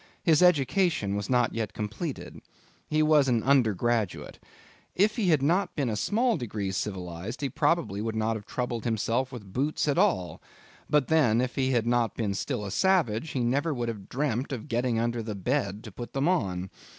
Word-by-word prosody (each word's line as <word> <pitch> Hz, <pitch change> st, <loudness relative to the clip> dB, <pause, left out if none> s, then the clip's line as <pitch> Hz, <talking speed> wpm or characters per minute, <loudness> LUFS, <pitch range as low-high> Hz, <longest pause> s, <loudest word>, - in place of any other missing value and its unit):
His 160 Hz, -2 st, +4 dB
education 160 Hz, -, +3 dB
was 100 Hz, 0 st, -3 dB
not 125 Hz, -2 st, +2 dB
yet 110 Hz, -2 st, -3 dB
completed. 110 Hz, -, -5 dB, 0.5 s
He 155 Hz, 0 st, +2 dB
was 155 Hz, -3 st, +4 dB
an 120 Hz, -4 st, +1 dB
undergraduate. 120 Hz, -5 st, +1 dB, 0.6 s
If 210 Hz, +3 st, +3 dB
he 220 Hz, -6 st, 0 dB
had 150 Hz, -5 st, +3 dB
not 175 Hz, +7 st, +1 dB
been 140 Hz, -5 st, 0 dB
a -, -, -1 dB
small 225 Hz, -, +1 dB
degree 105 Hz, -7 st, -3 dB
civilized, 95 Hz, -, -4 dB
he 140 Hz, -, -1 dB
very -, -, -18 dB
probably 165 Hz, -, +1 dB
would 110 Hz, 0 st, -3 dB
not 110 Hz, +1 st, 0 dB
have 105 Hz, -2 st, -8 dB
troubled 120 Hz, -3 st, -3 dB
himself 115 Hz, +3 st, 0 dB
with 105 Hz, -7 st, -10 dB
boots 145 Hz, +5 st, 0 dB
at 145 Hz, +3 st, +2 dB
all; 180 Hz, -, +1 dB, 0.5 s
but 150 Hz, -3 st, +3 dB
then, 135 Hz, -9 st, +3 dB
if 125 Hz, 0 st, -1 dB
he 130 Hz, -1 st, 0 dB
had 115 Hz, -2 st, +1 dB
not 120 Hz, -1 st, +1 dB
been 105 Hz, -4 st, -1 dB
still 110 Hz, +1 st, -3 dB
a 100 Hz, -, -5 dB
savage, 160 Hz, -, +2 dB
he 130 Hz, -, -2 dB
never 140 Hz, +6 st, 0 dB
would 120 Hz, -1 st, -2 dB
have 105 Hz, -4 st, -7 dB
dreamt 135 Hz, -1 st, -1 dB
of 125 Hz, -5 st, -5 dB
getting 120 Hz, 0 st, 0 dB
under 120 Hz, 0 st, -1 dB
the 110 Hz, -1 st, -5 dB
bed 105 Hz, -1 st, -1 dB
to 110 Hz, -, -9 dB
put 120 Hz, +5 st, -8 dB
them 135 Hz, +3 st, 0 dB
on. 95 Hz, -, -1 dB
120 Hz, 195 wpm, -27 LUFS, 110-150 Hz, 0.6 s, His